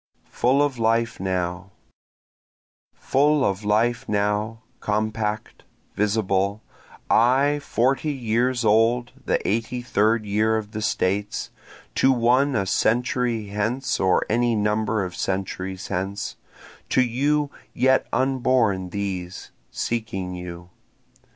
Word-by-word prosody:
Full 135 Hz, +4 st, +3 dB
of 140 Hz, -4 st, -1 dB
Life 115 Hz, +1 st, +1 dB
Now 90 Hz, 0 st, -2 dB, 1.3 s
Full 145 Hz, 0 st, +2 dB
of 95 Hz, +2 st, -1 dB
life 110 Hz, +3 st, +1 dB
now, 105 Hz, +2 st, -1 dB, 0.2 s
compact, 110 Hz, 0 st, -2 dB, 0.3 s
visible, 100 Hz, 0 st, 0 dB, 0.4 s
I, 135 Hz, +5 st, +3 dB
forty 140 Hz, +2 st, 0 dB
years 120 Hz, -1 st, 0 dB
old 115 Hz, +3 st, +3 dB, 0.2 s
the -, -, 0 dB
eighty 115 Hz, +4 st, -1 dB
third 110 Hz, -1 st, +1 dB
year 110 Hz, +2 st, +1 dB
of 105 Hz, -1 st, -5 dB
the 110 Hz, -, -5 dB
States, 100 Hz, 0 st, -1 dB, 0.4 s
To 135 Hz, -, +4 dB
one 130 Hz, +3 st, +3 dB
a 100 Hz, -3 st, +1 dB
century 115 Hz, +1 st, 0 dB
hence 125 Hz, +6 st, -1 dB
or 95 Hz, -1 st, +2 dB
any 120 Hz, +1 st, +1 dB
number 105 Hz, 0 st, 0 dB
of 90 Hz, -, -6 dB
centuries 95 Hz, 0 st, -3 dB
hence, 100 Hz, +2 st, -3 dB, 0.5 s
To 130 Hz, -, +3 dB
you 140 Hz, +4 st, 0 dB, 0.2 s
yet 130 Hz, +1 st, +3 dB
unborn 125 Hz, -7 st, +1 dB
these, 95 Hz, -2 st, -5 dB, 0.2 s
seeking 95 Hz, -6 st, -3 dB
you. 90 Hz, -1 st, -8 dB
110 Hz, 110 wpm, -23 LUFS, 100-125 Hz, 1.3 s, To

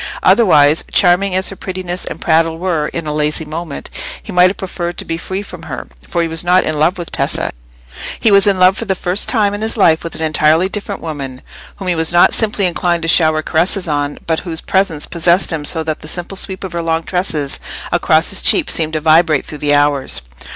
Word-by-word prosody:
Otherwise, 155 Hz, -9 st, +4 dB
charming 185 Hz, +1 st, +3 dB
as 190 Hz, 0 st, +2 dB
her 195 Hz, -, -7 dB
prettiness 185 Hz, -1 st, -5 dB
and -, -, -7 dB
prattle 165 Hz, 0 st, +1 dB
were 165 Hz, -4 st, -1 dB
in 170 Hz, -1 st, -5 dB
a 150 Hz, -, -3 dB
lazy 150 Hz, +1 st, -1 dB
moment, 155 Hz, -1 st, -6 dB, 0.4 s
he -, -, -9 dB
might 180 Hz, -1 st, +5 dB
have 195 Hz, -, -6 dB
preferred 175 Hz, -2 st, -5 dB
to -, -, -3 dB
be 165 Hz, -, -3 dB
free 190 Hz, +4 st, -5 dB
from 180 Hz, -4 st, -11 dB
her; 160 Hz, -4 st, -7 dB, 0.2 s
for 170 Hz, -, 0 dB
he -, -, -1 dB
was 165 Hz, +1 st, +1 dB
not 180 Hz, +1 st, +3 dB
in 155 Hz, -1 st, -2 dB
love 170 Hz, +5 st, +2 dB
with 175 Hz, -2 st, -7 dB
Tessa—he -, -, -3 dB
was 200 Hz, 0 st, +5 dB
in 200 Hz, -2 st, +3 dB
love 185 Hz, +1 st, +5 dB
for 230 Hz, -, -4 dB
the 195 Hz, -2 st, -1 dB
first 180 Hz, +2 st, 0 dB
time 210 Hz, -4 st, +1 dB
in 205 Hz, -, -5 dB
his 220 Hz, +1 st, -2 dB
life 160 Hz, -6 st, +3 dB
with 165 Hz, -, -6 dB
an 160 Hz, -, -4 dB
entirely 155 Hz, +3 st, +2 dB
different 200 Hz, 0 st, -5 dB
woman, 135 Hz, -5 st, -6 dB, 0.3 s
whom 195 Hz, -, -8 dB
he 180 Hz, -, +2 dB
was 160 Hz, -1 st, +1 dB
not 175 Hz, 0 st, +5 dB
simply 210 Hz, -3 st, 0 dB
inclined 175 Hz, -1 st, 0 dB
to -, -, -2 dB
shower 155 Hz, -2 st, +3 dB
caresses 180 Hz, +3 st, 0 dB
on, 145 Hz, -1 st, -2 dB
but 160 Hz, -1 st, 0 dB
whose 165 Hz, -3 st, -6 dB
presence 190 Hz, -6 st, -1 dB
possessed 170 Hz, +2 st, +2 dB
him 160 Hz, -2 st, -3 dB
so 160 Hz, +2 st, +1 dB
that 155 Hz, -1 st, -3 dB
the 155 Hz, -, -9 dB
simple 175 Hz, +4 st, -4 dB
sweep 190 Hz, 0 st, -3 dB
of 185 Hz, -3 st, -6 dB
her 170 Hz, -, -2 dB
long 165 Hz, 0 st, -1 dB
tresses 160 Hz, -7 st, -2 dB, 0.3 s
across -, -, +2 dB
his -, -, 0 dB
cheek 340 Hz, -, +4 dB
seemed 160 Hz, -1 st, +1 dB
to 155 Hz, -, 0 dB
vibrate 155 Hz, -1 st, +3 dB
through 150 Hz, -, -8 dB
the 145 Hz, 0 st, +2 dB
hours. 145 Hz, -, +1 dB
170 Hz, 225 wpm, -15 LUFS, 155-185 Hz, 0.4 s, might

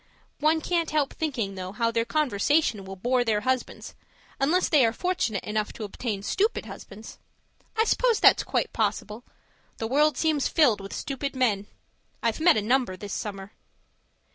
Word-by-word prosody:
One 315 Hz, +2 st, +2 dB
can't 335 Hz, -1 st, 0 dB
help 300 Hz, -3 st, 0 dB
thinking, 255 Hz, -11 st, -2 dB
though, 185 Hz, 0 st, -6 dB
how 230 Hz, +2 st, 0 dB
their 230 Hz, 0 st, 0 dB
conversation 275 Hz, -5 st, +1 dB
will 195 Hz, 0 st, -7 dB
bore 245 Hz, +6 st, +1 dB
their 215 Hz, -3 st, 0 dB
husbands, 255 Hz, +2 st, -2 dB, 0.5 s
unless 335 Hz, +7 st, +2 dB
they 295 Hz, -5 st, +4 dB
are 225 Hz, -1 st, +2 dB
fortunate 290 Hz, -, -1 dB
enough 210 Hz, 0 st, -2 dB
to 225 Hz, -, -7 dB
obtain 205 Hz, -1 st, -4 dB
stupid 415 Hz, -, 0 dB
husbands. 215 Hz, +3 st, -11 dB, 0.6 s
I 445 Hz, -, +5 dB
suppose 470 Hz, 0 st, +2 dB
that's -, -, +6 dB
quite 480 Hz, -, -2 dB
possible; 215 Hz, +1 st, -2 dB, 0.5 s
the 225 Hz, -, -3 dB
world 295 Hz, +6 st, +2 dB
seems 310 Hz, -4 st, +1 dB
to -, -, -8 dB
be -, -, -25 dB
filled 240 Hz, -10 st, +5 dB
with 195 Hz, -, -9 dB
stupid 275 Hz, 0 st, -4 dB
men; 210 Hz, -6 st, +1 dB, 0.6 s
I've 230 Hz, -1 st, 0 dB
met 330 Hz, -3 st, +5 dB
a 210 Hz, -, 0 dB
number 240 Hz, -4 st, +1 dB
this 200 Hz, 0 st, -7 dB
summer. 195 Hz, -1 st, -5 dB
240 Hz, 170 wpm, -26 LUFS, 210-305 Hz, 0.6 s, that's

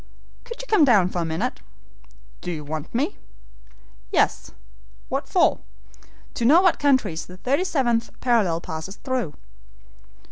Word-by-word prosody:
"Could 470 Hz, 0 st, -8 dB
you -, -, -11 dB
come 425 Hz, -9 st, +4 dB
down 205 Hz, -10 st, +5 dB
for 180 Hz, -, -3 dB
a -, -, -1 dB
minute?" 160 Hz, 0 st, -2 dB, 0.8 s
"Do 180 Hz, -, -4 dB
you 155 Hz, -3 st, -5 dB
want 155 Hz, +1 st, -5 dB
me?" 265 Hz, +6 st, -1 dB, 0.9 s
"Yes." -, -, +1 dB, 0.6 s
"What -, -, -3 dB
for?" -, -, +3 dB, 0.7 s
"To -, -, -3 dB
know 290 Hz, +9 st, +7 dB
what 370 Hz, -3 st, +3 dB
countries 260 Hz, -, +1 dB
the 180 Hz, -, -12 dB
thirty 275 Hz, -, 0 dB
seventh 240 Hz, -10 st, 0 dB
parallel 210 Hz, -10 st, +2 dB
passes 160 Hz, +5 st, -6 dB
through." 250 Hz, -, -3 dB
230 Hz, 140 wpm, -23 LUFS, 170-280 Hz, 0.9 s, know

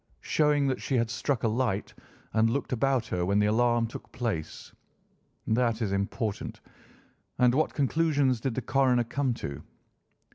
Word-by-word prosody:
"Showing 150 Hz, -2 st, +2 dB
that 130 Hz, -2 st, -1 dB
she 135 Hz, -, -1 dB
had 115 Hz, -1 st, 0 dB
struck 125 Hz, +2 st, -1 dB
a -, -, +3 dB
light 110 Hz, -3 st, -1 dB, 0.4 s
and 110 Hz, 0 st, +3 dB
looked 135 Hz, +2 st, -2 dB
about 130 Hz, -1 st, +1 dB
her 90 Hz, -5 st, -2 dB
when 100 Hz, +3 st, +1 dB
the 105 Hz, -, +4 dB
alarm 120 Hz, +2 st, +2 dB
took 115 Hz, -, -9 dB
place. 115 Hz, -11 st, -4 dB, 0.7 s
That 115 Hz, 0 st, +1 dB
is 100 Hz, -, -1 dB
important. 100 Hz, +2 st, -3 dB, 0.8 s
And 125 Hz, -1 st, +4 dB
what 155 Hz, +4 st, +1 dB
conclusions 145 Hz, -3 st, +2 dB
did 130 Hz, -3 st, -2 dB
the 130 Hz, -, -2 dB
coroner 130 Hz, -1 st, +3 dB
come 130 Hz, +1 st, -1 dB
to?" 70 Hz, -10 st, -6 dB
120 Hz, 155 wpm, -28 LUFS, 110-135 Hz, 0.8 s, the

